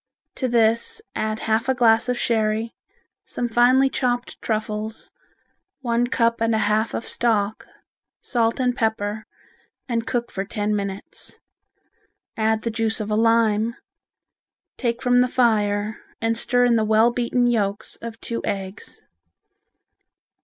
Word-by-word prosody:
To 260 - -2
this 230 - +2
add 215 0 -2
half 225 +3 0
a 265 - +3
glass 230 0 +4
of 250 - 0
sherry, 220 -1 0 0.5
some 245 - -3
finely 245 +3 +4
chopped 245 -2 -2
truffles, 215 0 -3 0.7
one 240 -1 +1
cup 230 -1 +1
and 230 0 +2
a 220 - +1
half 215 +2 +1
of - - -4
stock, 215 -3 0 0.5
salt 230 0 0
and 250 -1 +1
pepper, 220 -1 -2 0.6
and 230 -3 -2
cook 240 -1 -2
for 195 - -3
ten 210 +1 -2
minutes. 200 -1 -6 1.0
Add 220 0 +1
the 230 - -1
juice 225 0 -1
of 215 0 -4
a - - +2
lime, 225 0 +2 1.0
take 235 -2 -2
from 245 -1 +3
the 250 0 +5
fire 215 -4 +1 0.2
and 225 0 0
stir 245 +1 +2
in 235 -1 +4
the 220 - +2
well 220 +2 +4
beaten 245 0 0
yolks 210 -4 -1
of 230 -1 -8
two 230 - -4
eggs. 195 0 -5
225 Hz, 140 wpm, -23 LUFS, 215-240 Hz, 1.0 s, the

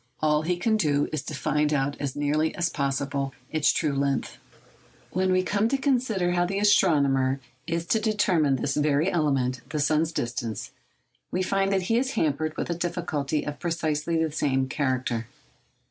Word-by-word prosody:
All 150 -1 +2
he 175 +3 -1
can 220 +4 +1
do 145 -7 +1
is 155 - -1
to 155 - -5
find 150 +1 +1
out 140 -1 0
as 140 -3 -3
nearly 150 +2 0
as 170 -1 0
possible 140 -1 -2 0.2
its 155 -2 +3
true 150 -3 0
length. 140 -1 -1 0.7
When 185 +1 +1
we 185 0 +3
come 205 +3 +1
to 275 - +1
consider 245 -10 +1
how 175 0 +2
the 190 +3 -2
astronomer 140 -10 +3 0.3
is 170 0 -1
to 220 - +2
determine 190 -10 +2
this 135 +2 -1
very 150 +4 +2
element—the 135 -3 0
sun's 155 +2 +2
distance—we 120 - -5
find 195 +1 +1
that 190 -1 +1
he 225 +6 +2
is 265 +1 -1
hampered 155 +1 0
with - - -2
a - - -1
difficulty 160 -4 -2
of 145 -1 -5
precisely 165 -1 -1
the 160 -1 0
same 135 -3 0
character. 130 -4 -1
155 Hz, 165 wpm, -26 LUFS, 140-180 Hz, 0.7 s, its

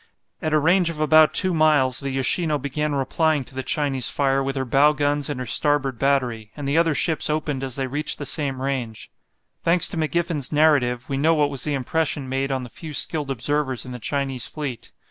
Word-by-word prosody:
At 155 - -2
a 155 - +4
range 170 +3 +3
of 160 -2 -6
about 155 0 +5
two 185 -2 +2
miles, 150 -5 +3
the 140 - -4
"Yoshino" 150 +4 +1
began 145 +2 -2
replying 150 +2 0
to 130 - -14
the 130 - -4
Chinese 135 -2 0
fire 135 -1 +1
with 135 0 -3
her 135 -1 -2
bow 140 +4 +4
guns 145 -1 -1
and 145 -3 -4
her 130 - -4
starboard 140 -3 +2
battery, 125 -6 0
and 145 -2 -5
the 140 - 0
other 165 -2 +3
ships 160 0 0
opened 150 -3 -2
as 130 -2 -4
they 135 - -2
reached 145 +4 -3
the 145 - -6
same 135 -3 -2
range. 125 -5 -4 0.5
Thanks 170 0 +2
to - - -5
McGiffen's 160 -2 -1
narrative, 140 -5 +2
we 135 - -2
know 160 +4 +3
what 145 -2 +1
was 135 - -4
the 150 - -1
impression 140 +1 -2
made 135 +1 -2
on 130 -1 -2
the 125 - -9
few 155 -3 -7
skilled 150 -1 +1
observers 135 0 -1
in 125 - -8
the 125 - -7
Chinese 135 0 -2
fleet. 140 -6 -6
140 Hz, 215 wpm, -22 LUFS, 130-155 Hz, 0.5 s, about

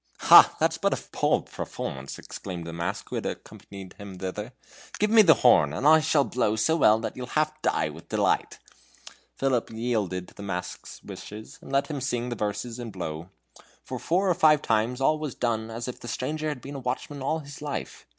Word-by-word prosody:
"Ha! - - +9
that's - - +1
but - - +2
a - - -14
poor - - +2
performance," 65 +1 -6
exclaimed 90 -4 -7
the 85 - -6
mask, 85 0 -4
who - - -3
had - - -4
accompanied 95 -2 -9
him 100 -2 -9
thither. 100 +5 -5 0.5
"Give 210 +1 +1
me 225 -1 +8
the 165 -7 +7
horn! 75 -12 +6
I 150 - +5
shall 155 -2 +3
blow 115 -5 0
so 115 +9 +2
well 110 -9 +5
that - - -4
you'll 125 -1 -6
half 155 +4 -1
die 80 - +1
with 80 +2 -12
delight." - - +1 0.8
Philip 130 -3 0
yielded 110 -6 -2
to - - -20
the - - -11
mask's 90 -3 -6
wishes, 105 +1 -10
and - - -11
let 140 0 +2
him 145 -4 -5
sing 125 -2 -2
the 120 - -3
verses 105 +3 -3
and 120 -2 -6
blow. 85 -2 -6 0.5
For - - -6
four 185 +4 +1
or 180 - +4
five 155 -3 +4
times 115 +4 0
all 155 +3 +3
was 150 -4 -4
done 115 -2 -1
as 115 +2 -5
if 125 - -6
the 120 - -9
stranger 155 +6 -2
had 145 -4 -5
been 140 - -8
a 140 - -5
watchman 130 +3 -4
all 150 +4 0
his 145 -2 -10
life. 145 -1 -5
120 Hz, 205 wpm, -26 LUFS, 100-145 Hz, 0.8 s, Ha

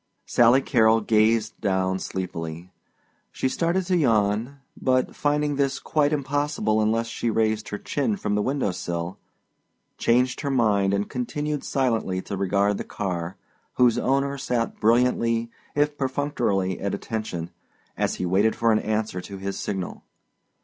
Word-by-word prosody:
Sally 120 +3 +5
Carrol 115 -3 +4
gazed 110 +1 +2
down 95 -2 0
sleepily. 85 -2 -5 0.6
She - - -1
started 170 +6 0
to 180 - +1
yawn, 115 - +1 0.2
but 130 0 +1
finding 145 -1 0
this 140 -1 +1
quite 150 -2 +1
impossible 145 -6 0
unless 115 +2 +1
she 115 0 -2
raised 110 -1 0
her 105 - -3
chin 115 -3 -1
from 105 - -2
the 105 - +2
window 130 -3 0
sill, 85 0 -4 0.8
changed 125 +2 +2
her 140 - -2
mind 105 -7 +2
and 100 +1 -1
continued 145 +4 -3
silently 115 -8 0
to 100 - -5
regard 100 +1 +1
the - - -2
car, 90 -2 -4 0.4
whose 120 -1 +4
owner 140 +2 0
sat 120 -3 -2
brilliantly 115 0 +2 0.2
if 145 0 +2
perfunctorily 120 -9 0
at 100 0 -1
attention 90 -7 -4 0.4
as - - 0
he 90 - -3
waited 100 +5 +2
for 115 0 +2
an 110 - +3
answer 110 -4 -2
to 100 +1 -8
his 95 0 -4
signal. 95 -3 -4
115 Hz, 145 wpm, -25 LUFS, 100-135 Hz, 0.8 s, Sally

